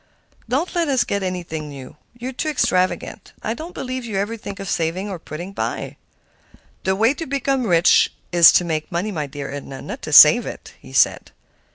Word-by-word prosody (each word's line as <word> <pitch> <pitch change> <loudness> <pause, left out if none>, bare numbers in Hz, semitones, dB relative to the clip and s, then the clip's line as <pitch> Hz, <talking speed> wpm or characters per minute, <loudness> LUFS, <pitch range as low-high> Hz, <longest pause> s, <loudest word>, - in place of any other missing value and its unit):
Don't 285 +9 -1
let 340 -2 0
us 265 -4 +2
get 200 -3 -2
anything 170 -5 -4
new; 135 -3 -10 0.2
you 245 +2 -5
are - - -7
too 310 +5 -2
extravagant. 185 -10 -1
I 220 - -1
don't 325 +8 -9
believe 255 0 -4
you 220 -4 -4
ever 205 +4 -2
think 200 -2 -8
of 195 - -6
saving 185 +4 -2
or 185 - -6
putting 175 +5 -8
by." - - -4 0.9
"The 190 0 +2
way 225 +6 +3
to 325 +2 -7
become 270 -2 -1
rich 170 -2 +4 0.2
is 175 -1 +8
to 175 - +3
make 155 -2 -3
money, 180 +5 -2
my 155 -6 -3
dear 140 0 -7
Edna, 135 -1 -7
not - - -7
to - - -6
save - - +8
it," - - -9
he - - -14
said. - - +2
195 Hz, 200 wpm, -21 LUFS, 165-245 Hz, 0.9 s, is